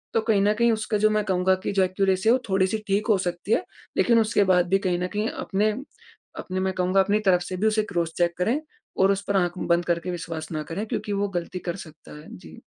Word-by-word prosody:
तो 225 - +4
कहीं 220 -3 +2
न 210 - +3
कहीं 235 +1 +3
उसका 215 -1 -1
जो 215 +1 +4
मैं 215 -1 +1
कहूँगा 185 -1 +2
कि - - -1
जो 195 -1 +3
एक्यूरेसी 190 +2 +1
वो 255 - +5
थोड़ी-सी 190 +2 +2
ठीक 200 +3 0
हो 210 -3 +4
सकती 175 +3 -4
है - - +2 0.3
लेकिन 235 -1 +4
उसके 215 -2 +2
बाद 180 -1 +3
भी 195 - +4
कहीं 175 -1 0
न 180 - -1
कहीं 210 +1 0
अपने 210 +2 -1 0.7
अपने 185 0 -4
मैं 190 0 0
कहूँगा 185 +1 +1
अपनी 205 +2 +1
तरफ 180 -2 +4
से 180 +1 -5
भी 215 +4 +1
उसे 215 0 +2
क्रॉस 170 -3 -1
चेक 170 -1 +1
करें 225 +11 +1 0.4
और 190 +1 +4
उस 195 0 -1
पर 200 -1 +1
आँख 175 -1 0
बंद 170 0 +1
करके 170 +1 -1
विश्वास 165 -2 -6
ना 155 -1 -3
करें 205 +6 -3
क्योंकि 210 - -3
वो 200 0 0
गलती 175 +1 -3
कर 175 -1 -4
सकता 155 -1 -14
है। 155 - -14
जी। 80 -3 -13
190 Hz, 245 wpm, -24 LUFS, 175-210 Hz, 0.7 s, वो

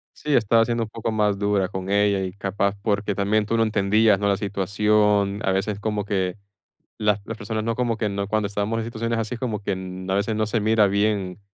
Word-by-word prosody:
Sí, 150 - -2
estaba 115 +2 +4
siendo 120 -1 -1
un 110 - -6
poco 115 0 -3
más 105 -2 +1
dura 100 -2 +1
con 95 -1 -6
ella, 100 -1 +2
y 95 - -4
capaz 100 0 -1
porque 100 -1 0
también 105 +2 +1
tú 115 - -1
no - - +3
entendías, 105 -1 +3
¿no?, 100 - 0
la 100 -1 +2
situación, 100 0 +1
a 95 - +1
veces 100 +2 -1
como 105 -2 -2
que 95 -2 -1 0.6
las 105 -1 +1
las 115 - -6
personas 110 +1 -3
no 115 0 0
como 120 -2 0
que 110 - -1
no 100 0 -3
cuando 110 -1 0
estábamos 105 +2 -2
en 110 - -2
situaciones 115 0 -2
así, 115 +2 -3
como 115 -4 -3
que, 100 -1 -1
mm, 95 0 -6
a - - +1
veces 105 +2 0
no 110 0 0
se 110 +1 0
mira 110 0 +4
bien 100 -1 0
105 Hz, 230 wpm, -23 LUFS, 100-110 Hz, 0.6 s, estaba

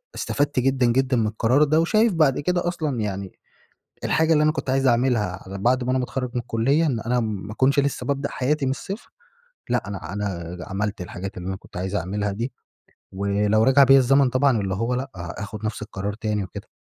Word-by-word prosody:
استفدت 145 -2 0
جدًا 130 0 +2
جدًا 130 +2 +2
من 110 -2 +2
القرار 115 +6 +2
ده 155 +1 +3
وشايف 215 +5 +3
بعد 155 -6 +3
كده 175 +3 0
أصلًا 155 -8 -2
يعني 100 -3 -3 0.7
الحاجة 160 0 +3
اللي 150 -1 +4
أنا 155 - +4
كنت 155 - -4
عايز 135 0 +2
أعملها 115 -6 +1
على 95 +1 -6
بعد 125 +5 +2
ما 125 - -3
أنا 130 - +2
ما - - -1
اتخرج 125 0 -3
من 125 - -1
الكلية 130 +8 +1
إن 130 -7 0
أنا 125 +2 0
ما 105 -2 -4
كنش 135 +5 +3
لسه 140 -1 -1
بابدأ 140 0 -1
حياتي 140 +2 0
من 130 - +1
الصفر 195 - -6 0.6
لأ، 120 -5 0
أنا 95 -4 -6
أنا 90 -4 -4
عملت 100 +1 -3
الحاجات 90 +2 -6
اللي 90 +1 -6
أنا 95 - -2
كنت 95 - -15
عايز 95 +2 -3
أعملها 100 +2 -1
دي، 115 +6 -4 0.6
ولو 100 +2 +1
رجع 135 +3 +6
بيَّ 135 +1 +7
الزمن 135 +1 +4
طبعًا 130 -2 +2
اللي 95 -1 -2
هو 115 +5 -1
لأ، 135 +2 -4
آخد 100 +5 -6
نفس 110 0 -3
القرار 100 -1 -4
تاني 105 -1 -2
وكده. 95 - -9
120 Hz, 205 wpm, -23 LUFS, 100-135 Hz, 0.7 s, بيَّ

